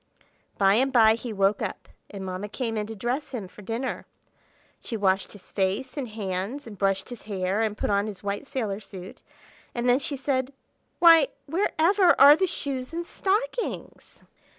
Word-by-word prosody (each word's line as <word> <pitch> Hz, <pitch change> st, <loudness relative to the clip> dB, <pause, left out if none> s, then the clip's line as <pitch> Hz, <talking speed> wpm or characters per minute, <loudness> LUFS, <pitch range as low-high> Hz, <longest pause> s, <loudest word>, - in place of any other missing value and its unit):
By 195 Hz, -1 st, +4 dB
and 260 Hz, +5 st, +3 dB
by 225 Hz, -3 st, +6 dB
he 230 Hz, +1 st, -5 dB
woke 200 Hz, 0 st, +1 dB
up, -, -, -5 dB, 0.2 s
and 195 Hz, -2 st, -7 dB
Mamma 185 Hz, +2 st, -5 dB
came 230 Hz, 0 st, -3 dB
in 210 Hz, -1 st, -2 dB
to 225 Hz, -, -7 dB
dress 245 Hz, +8 st, -3 dB
him 215 Hz, -7 st, -4 dB
for 210 Hz, -, -14 dB
dinner. 230 Hz, +6 st, -4 dB, 0.7 s
She 230 Hz, -, -5 dB
washed 195 Hz, -1 st, +1 dB
his 205 Hz, -3 st, -12 dB
face 195 Hz, +7 st, -1 dB
and 275 Hz, -4 st, -3 dB
hands, 210 Hz, +4 st, -4 dB
and 225 Hz, -3 st, -9 dB
brushed 195 Hz, +1 st, 0 dB
his 245 Hz, -2 st, -8 dB
hair, 195 Hz, 0 st, -1 dB
and 215 Hz, -1 st, -1 dB
put -, -, -1 dB
on 200 Hz, +1 st, +1 dB
his 205 Hz, -3 st, -8 dB
white 200 Hz, +6 st, -3 dB
sailor 220 Hz, -8 st, -3 dB
suit; 190 Hz, -3 st, -11 dB, 0.5 s
and 240 Hz, +1 st, -1 dB
then 245 Hz, +2 st, +4 dB
she 285 Hz, 0 st, -3 dB
said, 265 Hz, 0 st, -1 dB, 0.4 s
"Why, 330 Hz, -4 st, +7 dB, 0.2 s
where 340 Hz, +8 st, 0 dB
ever 360 Hz, +2 st, +4 dB
are 285 Hz, +2 st, +10 dB
the 375 Hz, +4 st, +1 dB
shoes 270 Hz, -3 st, -4 dB
and 340 Hz, +1 st, -3 dB
stockings?" 450 Hz, +7 st, -3 dB
225 Hz, 180 wpm, -26 LUFS, 200-275 Hz, 0.7 s, are